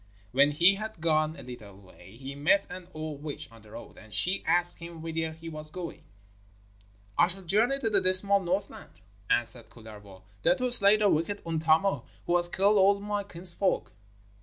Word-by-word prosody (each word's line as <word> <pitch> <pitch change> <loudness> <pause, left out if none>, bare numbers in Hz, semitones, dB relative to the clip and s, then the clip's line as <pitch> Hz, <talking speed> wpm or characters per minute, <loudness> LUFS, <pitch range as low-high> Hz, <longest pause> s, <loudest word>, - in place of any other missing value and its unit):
When 140 +4 +4
he 170 +6 +4
had 215 -1 -7
gone 155 -1 0
a - - -11
little 105 -6 -11
way 95 0 -17
he 135 +3 -8
met 185 +8 +2
an 180 -1 -9
old 155 -3 -7
witch 150 -1 -6
on 115 -1 -16
the 105 - -18
road, 115 - -12
and 110 -1 -16
she 180 - 0
asked 175 0 +1
him 170 -1 -10
whither 160 -1 -3
he 165 +1 -12
was 155 -1 -8
going. 175 +1 -8 1.1
'I 175 - +6
shall 190 +2 -5
journey 220 +10 +2
to 265 -5 -3
the 205 -3 +2
dismal 185 +2 +6
Northland,' 190 +2 -5 0.3
answered 120 0 -1
Kullervo, 105 -4 -14 0.2
'there 265 - +3
to 255 -2 -2
slay 205 -3 +4
the 210 -1 +2
wicked 195 +4 -1
Untamo, 160 -2 +1 0.2
who 175 - 0
has 175 0 -2
killed 200 +3 +2
all 200 +1 +4
my 205 0 -3
kinsfolk.' 185 0 +2
170 Hz, 185 wpm, -28 LUFS, 145-195 Hz, 1.1 s, I